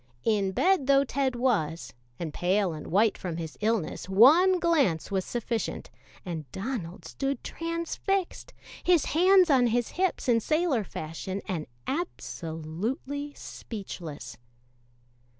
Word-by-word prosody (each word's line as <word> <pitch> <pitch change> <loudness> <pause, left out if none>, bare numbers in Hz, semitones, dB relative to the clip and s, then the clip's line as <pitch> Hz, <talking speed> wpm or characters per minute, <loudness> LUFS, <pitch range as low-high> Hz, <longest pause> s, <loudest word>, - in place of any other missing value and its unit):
In 205 -3 +1
bed 355 - +2
though 275 0 +5
Ted 265 -1 -1
was, 200 - 0 0.2
and 160 -3 -5
pale 185 0 +1
and 155 - -8
white 210 +5 +2
from 175 -4 -4
his 160 -2 -6
illness, 215 -5 -1
one 315 - +6
glance 280 - +2
was 190 -1 0
sufficient, 235 0 -3 0.3
and 160 -7 -6
Donald 200 -4 -5
stood 275 0 -3
transfixed, 335 +3 -3 0.3
his 345 -4 +4
hands 365 +1 +5
on 255 -3 +5
his 235 0 0
hips 370 -5 -1
in 235 -2 +4
sailor 305 -2 +1
fashion 180 +3 -5
and 170 -6 -3 0.2
absolutely 260 - -4
speechless. 160 - -8
230 Hz, 120 wpm, -28 LUFS, 175-290 Hz, 0.3 s, one